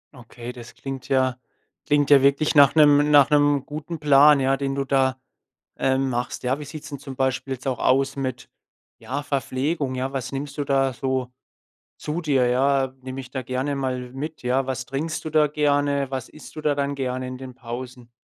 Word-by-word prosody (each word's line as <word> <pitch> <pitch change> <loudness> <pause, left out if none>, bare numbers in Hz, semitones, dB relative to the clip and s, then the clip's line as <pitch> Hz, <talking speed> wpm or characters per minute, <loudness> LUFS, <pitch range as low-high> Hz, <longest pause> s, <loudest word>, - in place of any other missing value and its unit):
Okay, 120 -1 -9
das 120 -1 -12
klingt 135 -2 -7
ja 130 -2 +1 0.5
klingt 145 -1 +2
ja 140 -2 +8
wirklich 140 +2 +3
nach 145 -1 +6
'nem 145 -1 +5
nach 145 -1 +6
'nem 145 -2 +3
guten 155 +2 -6
Plan, 145 0 +6
ja, 135 +1 +2
den 135 -1 -2
du 140 0 -1
da, 130 -1 +1 0.6
ähm, 135 0 +1
machst. 120 0 -3
Ja, 130 +3 0
wie 150 - -7
sieht's 150 +1 -9
denn 140 -2 -7
zum 135 -1 -9
Beispiel 130 +1 -1
jetzt 125 -1 -10
auch 130 - -1
aus 135 +1 +2
mit, 130 -3 -4 0.5
ja, 140 +3 -4
Verpflegung? 140 +1 -2
Ja, 130 +2 -3
was 130 -3 -4
nimmst 140 +2 -5
du 145 - -1
da 135 -1 +1
so 130 -1 -2 0.7
zu 155 +3 -4
dir? 135 -6 +2
Ja, 135 +1 +2
nimm 130 0 -7
mich 135 -1 -8
da 130 - -3
gerne 130 +4 -2
mal 130 -2 -3
mit, 155 +3 -6
ja? 130 +2 0
Was 130 -1 -3
trinkst 155 +5 -4
du 155 - -4
da 155 -1 +4
gerne? 145 -2 +1
Was 130 -3 -4
isst 155 - -14
du 155 - -6
da 150 -1 +1
dann 140 0 -1
gerne 130 -1 -3
in 130 - -6
den 130 -2 -9
Pausen? 125 0 -8
135 Hz, 200 wpm, -23 LUFS, 130-145 Hz, 0.7 s, ja